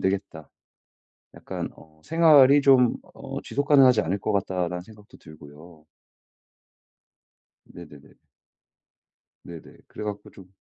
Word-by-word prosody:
되겠다 95 +1 -4 0.9
약간 - - -7
어 80 0 -21
생활이 145 -4 +4
좀 130 -3 +3 0.2
어 - - -8
지속 140 +5 -4
가능하지 130 -6 +5
않을 95 +5 -3
것 105 - -3
같다라는 90 -3 -3
생각도 105 +1 -18
들고요. 75 +2 -16 1.8
네네네. 75 -5 -15 1.3
네네. 85 -2 -13
그래 105 - -9
갖고 105 -1 -7
좀 95 - -16
100 Hz, 225 characters per minute, -24 LUFS, 85-125 Hz, 1.8 s, 가능하지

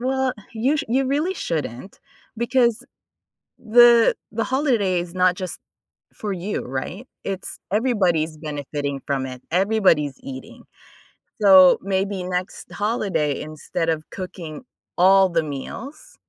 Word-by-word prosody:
Well, 265 0 0 0.2
you 250 +7 +1
sh - - -2
you 260 +3 +1
really 305 +8 0
shouldn't 155 - -5 0.4
because 235 0 +1 0.7
the 235 0 +6 0.2
the 225 +1 -1
holiday 235 - +1
is 175 0 -6
not 185 -1 +3
just 185 -1 -6 0.6
for 210 -2 -4
you, 190 +3 -3 0.2
right? 210 - -8 0.2
It's 195 -1 -5
everybody's 185 -9 +1
benefiting 145 -2 -4
from 135 -2 -1
it, 130 -1 -9
everybody's 185 -6 +2
eating. 130 -1 -9 0.8
So, 190 -3 +8
maybe 195 0 -1
next 180 0 -4
holiday, 200 - -1
instead 155 +2 -4
of 155 -1 -2
cooking 180 -4 -7 0.4
all 190 +2 +6
the 170 -2 +1
meals, 265 - -8
190 Hz, 120 wpm, -22 LUFS, 160-235 Hz, 0.8 s, So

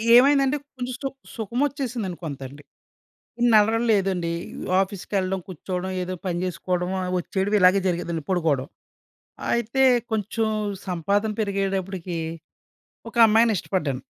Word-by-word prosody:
ఏమైందంటే, 275 +2 +5 0.2
కొంచెం 250 0 -3
స్తు 275 0 -3 0.3
సుఖమొచ్చేసిందండి 245 - -2
కొంతండి. 140 -1 -7 0.9
నడకలు 225 +2 +4
లేదండి. 185 -4 +1 0.5
ఆఫీస్ 195 -1 -2
కెళ్ళడం 190 -1 0
కూర్చోడం, 185 +1 -4
ఏదో 185 +1 -3
పని 175 -1 -1
జేసుకోడమా, 180 +1 -2 0.2
వచ్చేడం 195 +3 -1
ఇలాగే 185 +2 +6
జరిగేదండి 170 -3 -2
పడుకోడం. 160 -8 +1 0.9
అయితే 235 +3 +1 0.3
కొంచెం 220 +1 0 0.4
సంపాదన 200 +5 0
పెరిగేటప్పటికి 195 -3 -2 0.9
ఒక - - -19
అమ్మాయిని 225 +1 +4
ఇష్టపడ్డాను. 150 -9 -1
190 Hz, 100 wpm, -24 LUFS, 180-220 Hz, 0.9 s, ఇలాగే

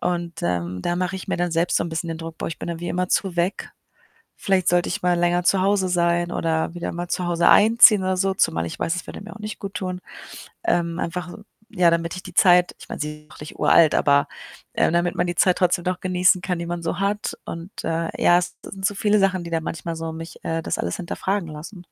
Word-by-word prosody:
und, 170 -1 -3
ähm, 90 +1 -2
da 175 0 -1
mache 180 +1 -1
ich 190 - -9
mir - - 0
dann 175 -1 -1
selbst 170 +1 +1
so - - +1
'n - - -4
bisschen 165 +1 -3
den 165 0 -4
Druck: 165 -1 -8
„Boah, - - -3
ich 165 - -7
bin - - -6
dann 170 0 -4
wie 175 - -4
immerzu 180 0 0
weg. 175 +3 -1 0.7
Vielleicht 185 -2 +1
sollte 175 0 +2
ich - - -3
mal 175 -1 +2
länger 175 0 +2
zu 190 -2 +3
Hause 195 -1 +2
sein 175 0 +1
oder 160 0 -1
wieder 175 0 -4
mal 175 +1 -5
zu 180 - -1
Hause 170 0 +2
einziehen 220 -1 +7
oder 185 0 0
so“, 195 0 +1
zumal 85 - +1
ich 85 - -7
weiß, 165 - 0
es 180 - -5
würde - - -8
mir 210 - -9
auch 215 - -12
nicht 215 0 -6
guttun. 185 -2 -5 0.6
Ähm, 170 - 0
einfach 180 +1 -3
so, 210 - -11 0.3
ja, 180 -5 +3
damit 170 +1 -1
ich 180 - -7
die 185 - -10
Zeit 180 -1 +5
ich - - -13
meine, - - -6
sie 150 0 -6
auch - - -14
nicht 150 - -9
uralt, 160 -2 +5
aber, 140 0 +3 0.5
äh, - - +2
damit 175 +1 +1
man - - +1
die 175 - -2
Zeit 180 -1 +3
trotzdem 175 -1 +1
noch 180 0 -2
genießen 185 0 +3
kann, 180 -2 -2
die 170 - -4
man 175 0 -4
so 170 +2 -3
hat. 205 +1 -1
Und, 170 +3 -7
äh, 165 0 -1
ja, 175 - +6
es 175 - -4
sind 190 -1 -3
so 205 - -1
viele 210 +1 +2
Sachen, 190 -2 +1
die 170 - -7
dann 165 -1 -1
manchmal 165 +1 -4
so 165 0 -4
mich, 165 +1 -9
äh, 165 0 -2
das - - -2
alles 85 - -2
hinterfragen 190 +1 -3
lassen. 175 +5 -9
175 Hz, 250 wpm, -23 LUFS, 165-185 Hz, 0.7 s, einziehen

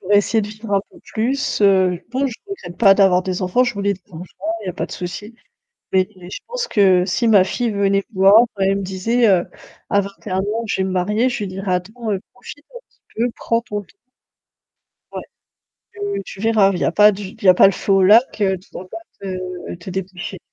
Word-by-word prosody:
Pour 195 +2 -3
essayer 205 +2 +3
de - - -4
vivre 215 0 -5
un 195 - +3
peu - - -17
plus. 255 +5 -2
Heu, 190 -3 +3
bon, 265 +3 0
je 250 - -5
regrette 280 - -8
pas 195 -4 +6
d'avoir 190 -2 +4
des 185 0 -3
enfants, 185 +8 +2
je 245 -2 -2
voulais 200 0 0
des 190 - -20
enfants, 165 +2 -8 0.4
il - - -9
y - - -2
a - - -2
pas - - -4
de - - -11
souci. 185 +5 -7 0.6
Mais 185 -1 +2
je 180 +1 -8
pense 485 0 -3
que 190 -4 +4
si 215 +6 0
ma 200 -4 +6
fille 235 +5 -2
venait 200 -1 +1
me 195 - -12
voir, 195 +1 +7 0.3
et - - +3
elle 195 +1 +2
me - - -4
disait, 215 +6 +1
heu, 185 -3 +3 0.4
à 200 - +3
21 200 -1 -5
ans, 215 +4 -2
je 200 - -2
vais - - 0
me 190 - -2
marier, 210 +7 +1
je 240 - -3
lui 205 - -3
dirais: 190 0 -4
«Attends 215 +6 -4
heu, 195 - -2
profite 290 +4 -12
un - - -7
petit - - -37 0.2
peu, 235 +2 0
prends 230 0 0
ton 210 -3 -5
t» 180 - -23 1.2
Ouais. - - -5 0.7
Tu 405 -1 -4
tu 190 - -10
verras, 215 -3 +3
il 180 - -3
y - - -1
a - - +1
pas 210 +3 +6
du 205 +1 -7
il 205 +4 -10
y - - +5
a 185 - +8
pas - - +7
le 195 - +3
feu 195 - -1
au 195 0 +4
lac, 220 +5 +4
heu, 190 -2 +2
tu 185 - -23
dois 185 - -9
pas 220 - -7 0.2
te 185 -2 -6
te 175 +2 -9
dépêcher. 185 0 -6
200 Hz, 245 wpm, -19 LUFS, 185-225 Hz, 1.2 s, a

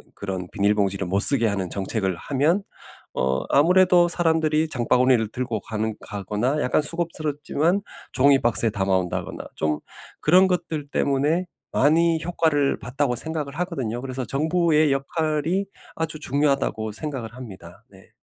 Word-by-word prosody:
그런 95 -2 -5
비닐봉지를 100 -2 0
못 95 +2 0
쓰게 130 -2 +7
하는 100 -3 -2
정책을 95 0 -2
하면 150 - 0 0.5
어 65 0 0
아무래도 180 +3 +5
사람들이 160 -2 +1
장바구니를 125 -3 +2
들고 120 -3 -3
가는 110 +2 -3
가거나 105 +8 -2
약간 125 - +2
수고스럽지만 155 +2 -1 0.3
종이 135 +1 +4
박스에 115 -1 +2
담아 95 -1 -1
온다거나 90 -1 -3
좀 75 -1 -1 0.4
'그런 185 +4 +5
것들 160 -5 -2
때문에 145 +6 0 0.3
많이 160 +3 +3
효과를 160 -5 +1
봤다.'고 125 0 -1
생각을 150 -1 -3
하거든요. 135 - -3
그래서 130 0 -5
'정부의 155 +2 +2
역할이 155 +6 -1 0.3
아주 160 -1 -2
중요하다.'고 140 -7 0
생각을 120 -3 -6
합니다. 95 -5 -11
네. 95 -1 -18
140 Hz, 340 characters per minute, -23 LUFS, 110-160 Hz, 0.5 s, 쓰게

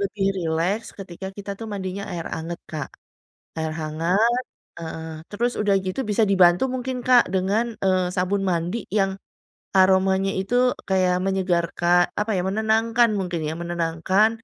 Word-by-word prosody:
lebih 200 0 -1
rileks 170 +5 -1
ketika 190 -1 -8
kita 200 0 -7
tuh 225 - -5
mandinya 195 0 -4
air 170 -2 -4
anget, 170 +1 -5
Kak. 155 -3 -4 0.7
Air 160 0 -2
hangat 180 +11 +1 0.4
heeh. 160 -1 -6 0.2
Terus 235 +4 0
udah 205 -2 +2
gitu 185 +8 -2
bisa 210 +2 +2
dibantu 180 +1 +5
mungkin, 255 0 -3
Kak, 250 -1 +6
dengan, 210 +5 0
eee, 185 -1 +2
sabun 190 +2 0
mandi 180 +5 -1
yang 195 0 0 0.6
aromanya 190 +1 +4
itu 195 +5 -4 0.4
kayak 185 -1 +3
menyegarka 180 -3 0 0.3
apa 210 +1 0
ya, - - +1
menenangkan 225 +3 +2
mungkin 180 -3 -2
ya, 155 - -2
menenangkan, 175 +4 +1
190 Hz, 140 wpm, -23 LUFS, 175-210 Hz, 0.7 s, Kak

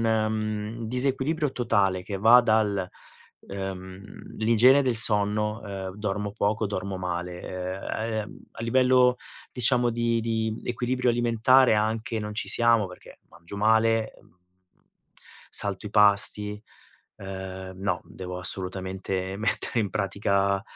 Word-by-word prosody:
mhmm, 110 0 -1
disequilibrio 135 +4 -1
totale 100 -6 0
che 100 +2 -5
va 115 +5 +7
dal, 105 -5 +1 0.5
uhm, 95 0 -8
l'igiene 115 +5 +5
del 125 -4 0
sonno, 105 0 +2
uhm, 95 -2 -6
dormo 105 -1 -3
poco, 105 +2 -1
dormo 100 -1 -4
male, 90 +1 -5 0.5
uhm, - - -12
uhm, - - -14
a - - -9
livello, 125 +1 +3 0.4
diciamo 125 0 +3
di 115 0 0
di 110 -1 -2
equilibrio 125 +1 -1
alimentare 120 +1 +4
anche 110 +2 -1
non 105 0 -5
ci 115 - -2
siamo 115 -3 +4
perché 90 - -14
mangio 85 +4 -11
male, 110 +1 +2
ehm, 90 - -23 1.1
salto 100 0 -1
i - - -7
pasti. 105 0 +3 0.5
Uhm, 95 -1 -7
no, 100 +2 -1
devo 90 -1 -8
assolutamente 95 +1 -3
mettere 110 +3 -1
in 105 - -1
pratica, 100 -1 0
105 Hz, 120 wpm, -26 LUFS, 95-115 Hz, 1.1 s, va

